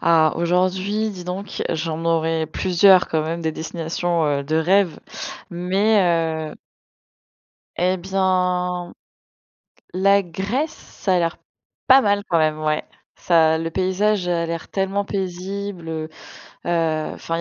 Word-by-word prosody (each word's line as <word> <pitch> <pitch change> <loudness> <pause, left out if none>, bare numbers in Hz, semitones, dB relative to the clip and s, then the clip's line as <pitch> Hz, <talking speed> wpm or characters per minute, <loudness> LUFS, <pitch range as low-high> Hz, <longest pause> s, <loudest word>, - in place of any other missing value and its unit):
Ah, 160 -2 +4
aujourd'hui, 185 +5 0
dis 180 -3 -8
donc, 185 +3 -5
j'en 165 0 -3
aurai 165 -1 +1
plusieurs 185 +3 +4
quand 160 -1 0
même, 165 +2 -3
des 160 -1 -1
destinations, 165 +1 -2
heu, 140 -1 0
de 155 +3 0
rêve, 180 +1 +2 0.5
mais, 175 -4 +1
heu - - -10 1.2
et 185 +2 +1
bien, 180 -1 0 1.0
la 195 +2 +4
Grèce, 200 - -2
ça 190 -10 -3
a - - +4
l'air 170 -1 -1 0.5
pas 265 +1 +8
mal 205 -2 +2
quand 170 - +3
même, 155 -1 +1
ouai. 155 0 0 0.3
Ça 160 -2 +4
le 165 +1 -3
paysage 190 +2 0
a 170 -1 +1
l'air 165 0 -5
tellement 195 +1 -1
paisible. 190 -1 -4
Heu, 160 -1 -4 0.6
heu, 165 -2 0
enfin 165 - -4
il - - -2
175 Hz, 135 wpm, -21 LUFS, 165-190 Hz, 1.2 s, pas